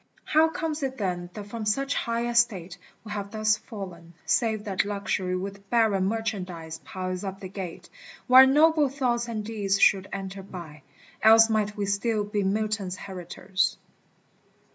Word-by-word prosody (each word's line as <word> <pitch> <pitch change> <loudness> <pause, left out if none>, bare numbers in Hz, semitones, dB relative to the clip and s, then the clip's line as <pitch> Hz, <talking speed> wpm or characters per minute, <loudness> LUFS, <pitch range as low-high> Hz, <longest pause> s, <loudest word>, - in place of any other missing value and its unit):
How 315 +1 +4
comes 320 -2 -3
it 265 -1 -3
then 180 -4 -2
that 210 -2 -6
from 220 +2 -6
such 275 +7 0
high 235 0 -1
estate 225 -7 +1 0.3
We 215 - -9
have 200 -1 -4
thus 215 0 +1
fallen, 175 -6 -9
save 220 -3 +1
that 195 -3 0
Luxury 200 -2 -2
With 195 +1 -6
barren 220 -5 +3
merchandise 185 -7 -4
piles 185 +1 -5
up 195 -1 -5
the 190 - -7
gate 185 -3 -7 0.4
Where 260 +1 +9
noble 300 +1 +4
thoughts 245 -3 -1
and 215 -3 -4
deeds 200 -3 -1
should 195 -1 +4
enter 195 0 -5
by: 170 -6 -10 0.4
Else 225 +1 +7
might 210 -1 0
we 205 - -1
still 205 +2 0
be 205 0 -2
Milton's 200 -1 -1
heritors. 185 0 -2
205 Hz, 155 wpm, -26 LUFS, 190-230 Hz, 0.4 s, Where